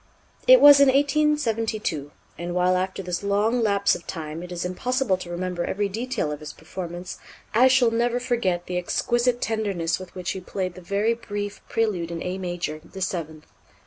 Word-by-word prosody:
It -, -, +9 dB
was 290 Hz, -1 st, +10 dB
in 280 Hz, -, +7 dB
1872; 255 Hz, -, +1 dB, 0.3 s
and 175 Hz, +2 st, -5 dB
while 180 Hz, 0 st, +3 dB
after 185 Hz, +1 st, -2 dB
this 180 Hz, -1 st, -3 dB
long 205 Hz, +4 st, +1 dB
lapse 200 Hz, -2 st, +3 dB
of 170 Hz, -, -6 dB
time 160 Hz, -1 st, -5 dB
it 180 Hz, 0 st, -9 dB
is 175 Hz, 0 st, -3 dB
impossible 240 Hz, +4 st, 0 dB
to 180 Hz, -1 st, -9 dB
remember 175 Hz, 0 st, -3 dB
every 200 Hz, +2 st, -1 dB
detail 230 Hz, -5 st, -2 dB
of 150 Hz, -, -5 dB
his 155 Hz, -1 st, -8 dB
performance, 175 Hz, +1 st, -7 dB, 0.3 s
I 245 Hz, +4 st, +6 dB
shall 255 Hz, -3 st, +4 dB
never 240 Hz, +1 st, +1 dB
forget 230 Hz, -8 st, -1 dB
the 180 Hz, 0 st, -2 dB
exquisite 240 Hz, +6 st, 0 dB
tenderness 200 Hz, -7 st, -1 dB
with 185 Hz, -1 st, -11 dB
which 180 Hz, -1 st, -3 dB
he 190 Hz, -, -5 dB
played 185 Hz, 0 st, -3 dB
the 185 Hz, -, -11 dB
very 200 Hz, +5 st, +1 dB
brief 205 Hz, -3 st, -5 dB
Prélude 205 Hz, -7 st, 0 dB
in 170 Hz, -1 st, -5 dB
A 185 Hz, +1 st, -3 dB
major, 175 Hz, -4 st, -4 dB
the 195 Hz, -, -11 dB
seventh. 160 Hz, -4 st, -4 dB
190 Hz, 180 wpm, -24 LUFS, 175-230 Hz, 0.3 s, was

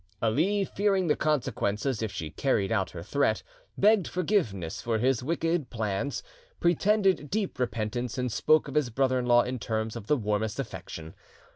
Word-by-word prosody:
Ali, 165 Hz, -, +2 dB
fearing 195 Hz, -2 st, +1 dB
the 150 Hz, -, +3 dB
consequences 130 Hz, -5 st, 0 dB
if 110 Hz, -2 st, -2 dB
she 80 Hz, -4 st, -5 dB
carried 110 Hz, -, 0 dB
out 95 Hz, -5 st, +1 dB
her 85 Hz, -2 st, -8 dB
threat, 125 Hz, -1 st, +1 dB, 0.3 s
begged 210 Hz, -2 st, +4 dB
forgiveness 140 Hz, -, -1 dB
for 115 Hz, -1 st, 0 dB
his 125 Hz, +1 st, +2 dB
wicked 165 Hz, +1 st, -1 dB
plans, 110 Hz, +4 st, -2 dB, 0.4 s
pretended 190 Hz, -2 st, +2 dB
deep 205 Hz, -9 st, -2 dB
repentance, 120 Hz, -1 st, -2 dB
and 125 Hz, -1 st, -1 dB
spoke 155 Hz, +7 st, +3 dB
of 140 Hz, -, -6 dB
his 150 Hz, -5 st, +2 dB
brother 130 Hz, +2 st, +1 dB
in 125 Hz, -, -2 dB
law 120 Hz, 0 st, +6 dB
in 125 Hz, 0 st, -4 dB
terms 110 Hz, 0 st, -2 dB
of 100 Hz, -, -7 dB
the 150 Hz, -, +3 dB
warmest 105 Hz, 0 st, -1 dB
affection. 80 Hz, -10 st, -6 dB
125 Hz, 165 wpm, -28 LUFS, 110-155 Hz, 0.4 s, law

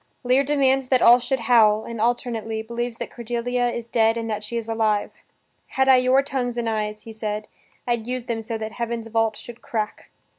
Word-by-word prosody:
Lear 255 Hz, +2 st, +3 dB
demands 270 Hz, -2 st, +2 dB
that 255 Hz, -1 st, +3 dB
all 240 Hz, +1 st, +8 dB
should 260 Hz, +1 st, -2 dB
howl, 220 Hz, -3 st, +4 dB
and, 230 Hz, -2 st, -6 dB
alternately, 225 Hz, -2 st, -1 dB
believes 235 Hz, +1 st, -4 dB
that -, -, -6 dB
Cordelia 245 Hz, +1 st, -1 dB
is 235 Hz, -1 st, -5 dB
dead 225 Hz, -1 st, +2 dB
and 230 Hz, 0 st, -3 dB
that 210 Hz, 0 st, -3 dB
she 235 Hz, +2 st, -4 dB
is 230 Hz, -1 st, -4 dB
alive. 220 Hz, -2 st, 0 dB, 0.6 s
"Had 265 Hz, 0 st, 0 dB
I 265 Hz, -1 st, +7 dB
your 255 Hz, +2 st, +3 dB
tongues 250 Hz, -3 st, -3 dB
and 235 Hz, -1 st, -1 dB
eyes," 215 Hz, -1 st, -2 dB
he 225 Hz, -, -9 dB
says 215 Hz, -1 st, -3 dB, 0.4 s
"I'd 235 Hz, -2 st, -1 dB
use 250 Hz, 0 st, -3 dB
them 230 Hz, -2 st, -3 dB
so 225 Hz, +1 st, -4 dB
that 220 Hz, 0 st, -5 dB
heaven's 235 Hz, -1 st, -4 dB
vault 225 Hz, -1 st, +1 dB
should 240 Hz, 0 st, -11 dB
crack." 230 Hz, -7 st, -4 dB
235 Hz, 200 wpm, -23 LUFS, 220-245 Hz, 0.6 s, all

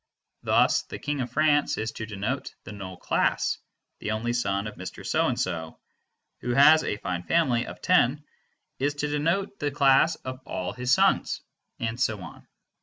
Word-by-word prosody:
Thus -, -, +3 dB
"the -, -, -8 dB
King 145 Hz, -2 st, -2 dB
of 125 Hz, -, -3 dB
France" 145 Hz, +1 st, +2 dB
is 110 Hz, +1 st, -2 dB
to 110 Hz, -, -6 dB
denote 100 Hz, -1 st, -4 dB
the -, -, -9 dB
null 95 Hz, -3 st, -8 dB
class; -, -, 0 dB, 0.4 s
"the -, -, -4 dB
only 110 Hz, +2 st, -1 dB
son 100 Hz, -4 st, 0 dB
of 105 Hz, -, -5 dB
Mr. 95 Hz, +2 st, -8 dB
So -, -, +2 dB
and -, -, -1 dB
so" 80 Hz, -1 st, -3 dB, 0.6 s
(who 120 Hz, 0 st, -2 dB
has 155 Hz, +3 st, +7 dB
a 105 Hz, -, -2 dB
fine 90 Hz, -4 st, -3 dB
family 125 Hz, -, +1 dB
of -, -, -9 dB
ten), 150 Hz, -5 st, +3 dB, 0.6 s
is 145 Hz, +2 st, 0 dB
to 150 Hz, +1 st, -2 dB
denote 170 Hz, +8 st, -1 dB
the 145 Hz, -, 0 dB
class 140 Hz, +3 st, +4 dB
of 130 Hz, 0 st, -5 dB
all 90 Hz, -6 st, -4 dB
his 125 Hz, 0 st, -2 dB
sons; -, -, +3 dB, 0.4 s
and 115 Hz, +1 st, -3 dB
so 110 Hz, -5 st, +1 dB
on. 90 Hz, -, -11 dB
125 Hz, 180 wpm, -26 LUFS, 105-145 Hz, 0.6 s, has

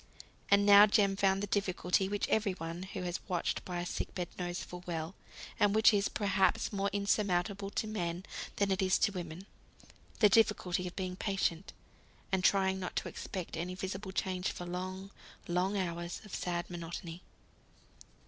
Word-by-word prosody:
And 200 Hz, 0 st, +5 dB
now 205 Hz, +1 st, +9 dB
Jem 200 Hz, -2 st, +3 dB
found 195 Hz, 0 st, +2 dB
the 205 Hz, -, -2 dB
difficulty 190 Hz, -1 st, +1 dB
which 205 Hz, 0 st, -1 dB
every 210 Hz, -3 st, +1 dB
one 165 Hz, 0 st, -6 dB
who 190 Hz, 0 st, -5 dB
has 175 Hz, 0 st, -2 dB
watched 175 Hz, -2 st, -1 dB
by 180 Hz, -1 st, -4 dB
a 175 Hz, -, -3 dB
sick -, -, -4 dB
bed 180 Hz, -2 st, -3 dB
knows 175 Hz, 0 st, -3 dB
full 180 Hz, 0 st, -9 dB
well; 165 Hz, 0 st, -3 dB, 0.5 s
and 205 Hz, 0 st, +4 dB
which 220 Hz, 0 st, +6 dB
is 200 Hz, -1 st, +2 dB
perhaps 200 Hz, 0 st, +1 dB
more 200 Hz, 0 st, 0 dB
insurmountable 200 Hz, -1 st, 0 dB
to 205 Hz, -, -2 dB
men 180 Hz, -4 st, -3 dB, 0.3 s
than 200 Hz, -1 st, +1 dB
it 190 Hz, +1 st, +1 dB
is 190 Hz, 0 st, +3 dB
to 205 Hz, -, +2 dB
women, 175 Hz, -1 st, -6 dB, 0.7 s
the 215 Hz, -, +7 dB
difficulty 190 Hz, -4 st, +2 dB
of 175 Hz, -, -8 dB
being 185 Hz, -1 st, -3 dB
patient, 195 Hz, -3 st, -1 dB, 0.6 s
and 190 Hz, -1 st, +1 dB
trying 190 Hz, -1 st, +3 dB
not 180 Hz, -, -5 dB
to -, -, -1 dB
expect 185 Hz, -3 st, -6 dB
any 175 Hz, +3 st, -3 dB
visible 190 Hz, +1 st, -5 dB
change 185 Hz, -1 st, -1 dB
for 175 Hz, -, -7 dB
long, 185 Hz, +2 st, -5 dB, 0.4 s
long 180 Hz, +3 st, +1 dB
hours 170 Hz, -2 st, -3 dB
of 210 Hz, -, -12 dB
sad 175 Hz, -1 st, -2 dB
monotony. 170 Hz, 0 st, -6 dB
190 Hz, 170 wpm, -33 LUFS, 175-200 Hz, 0.7 s, now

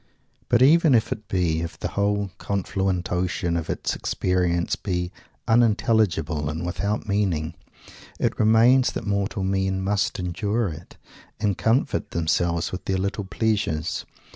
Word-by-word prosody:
But 120 Hz, +1 st, +5 dB
even 155 Hz, 0 st, +6 dB
if 115 Hz, -, +1 dB
it 110 Hz, -2 st, -5 dB
be 85 Hz, -4 st, 0 dB
if 85 Hz, -, -5 dB
the -, -, -3 dB
whole 100 Hz, -1 st, 0 dB
confluent 95 Hz, -2 st, -1 dB
ocean 90 Hz, -1 st, -1 dB
of 80 Hz, -2 st, -3 dB
its -, -, -1 dB
experiences 90 Hz, -2 st, 0 dB
be 90 Hz, -3 st, -3 dB, 0.4 s
unintelligible 105 Hz, -9 st, +2 dB
and 80 Hz, +3 st, -4 dB
without 100 Hz, +5 st, -2 dB
meaning; 95 Hz, -6 st, 0 dB, 0.6 s
it -, -, -1 dB
remains 115 Hz, +4 st, +5 dB
that 115 Hz, -, -4 dB
mortal 100 Hz, -1 st, -1 dB
men 95 Hz, 0 st, 0 dB
must 100 Hz, -2 st, 0 dB
endure 100 Hz, +4 st, -1 dB
it, 80 Hz, +2 st, -10 dB, 0.4 s
and 105 Hz, -3 st, +1 dB
comfort 120 Hz, +6 st, +1 dB
themselves 85 Hz, +1 st, 0 dB
with 90 Hz, -, -6 dB
their 95 Hz, -, 0 dB
"little 100 Hz, +2 st, -2 dB
pleasures." 100 Hz, -7 st, -1 dB
95 Hz, 140 wpm, -24 LUFS, 85-105 Hz, 0.6 s, even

